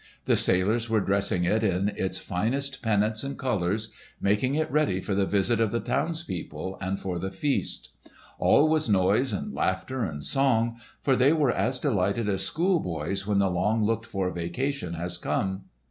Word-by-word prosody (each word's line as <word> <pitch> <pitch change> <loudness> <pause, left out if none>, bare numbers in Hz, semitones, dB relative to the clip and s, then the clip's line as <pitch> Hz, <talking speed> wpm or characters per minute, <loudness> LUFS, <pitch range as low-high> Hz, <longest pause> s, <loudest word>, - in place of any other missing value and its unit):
The - - +3
sailors 110 +6 +2
were 110 -1 +3
dressing 100 -2 +1
it 110 +5 +1
in 95 -1 +1
its 95 -2 -2
finest 135 +9 -1
pennants 110 -1 +1
and 140 0 -5
colours, 105 -3 -1 0.3
making 105 +7 +1
it 155 0 -1
ready 150 -12 +2
for 100 - -3
the 95 0 +1
visit 105 +4 +1
of 110 - +2
the 115 - -1
townspeople 115 - -3
and 95 0 -2
for 90 -2 -3
the 95 +2 -3
feast. 140 +8 -2 0.5
All 150 - +5
was 155 -5 +1
noise 100 +6 +3
and 100 - -4
laughter 130 -1 -1
and 75 -7 -4
song, 115 - +2 0.2
for 135 - +3
they 130 +4 +4
were 150 -6 +2
as 130 +2 0
delighted 105 -4 0
as 95 -2 +1
schoolboys 100 - 0
when 105 -1 +1
the 100 -1 +2
long 105 +5 +1
looked 115 +1 0
for 95 -4 -2
vacation 90 +4 -3
has 85 +1 -3
come. 95 0 -2
105 Hz, 175 wpm, -27 LUFS, 95-130 Hz, 0.5 s, All